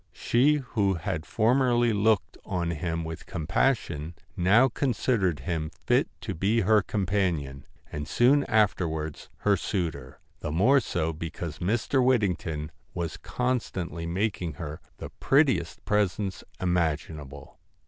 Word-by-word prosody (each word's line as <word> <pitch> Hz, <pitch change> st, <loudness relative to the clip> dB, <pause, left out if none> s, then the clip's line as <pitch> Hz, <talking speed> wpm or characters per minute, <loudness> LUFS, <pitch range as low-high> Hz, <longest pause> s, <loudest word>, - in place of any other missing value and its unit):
She 135 Hz, +6 st, +3 dB
who 110 Hz, -8 st, 0 dB
had 85 Hz, -2 st, -4 dB
formerly 120 Hz, 0 st, +3 dB
looked 105 Hz, 0 st, +2 dB
on 85 Hz, -2 st, -2 dB
him 85 Hz, +1 st, -2 dB
with 80 Hz, 0 st, -7 dB
compassion, 85 Hz, -, -1 dB, 0.2 s
now 105 Hz, +9 st, +5 dB
considered 115 Hz, -, 0 dB
him 80 Hz, +1 st, -2 dB, 0.2 s
fit -, -, +3 dB
to -, -, -4 dB
be 105 Hz, +7 st, +1 dB
her 105 Hz, +2 st, +4 dB
companion, 90 Hz, -10 st, -1 dB, 0.3 s
and 75 Hz, 0 st, -5 dB
soon 140 Hz, +4 st, +4 dB
afterwards 85 Hz, -8 st, 0 dB
her 105 Hz, -1 st, +4 dB
suitor; 80 Hz, -, -3 dB, 0.2 s
the 75 Hz, -, -4 dB
more 115 Hz, -, +5 dB
so 80 Hz, -8 st, -2 dB
because 80 Hz, 0 st, -6 dB
Mr. 120 Hz, +7 st, +1 dB
Whittington 90 Hz, -11 st, 0 dB, 0.2 s
was 85 Hz, -3 st, -3 dB
con 125 Hz, 0 st, 0 dB
stantly 85 Hz, -5 st, -5 dB
making 90 Hz, -2 st, -1 dB
her 75 Hz, +1 st, -7 dB, 0.2 s
the -, -, -8 dB
prettiest -, -, +2 dB
presents 100 Hz, -1 st, 0 dB, 0.2 s
imagin 80 Hz, -3 st, 0 dB
able. 70 Hz, 0 st, -12 dB
90 Hz, 130 wpm, -27 LUFS, 80-110 Hz, 0.3 s, now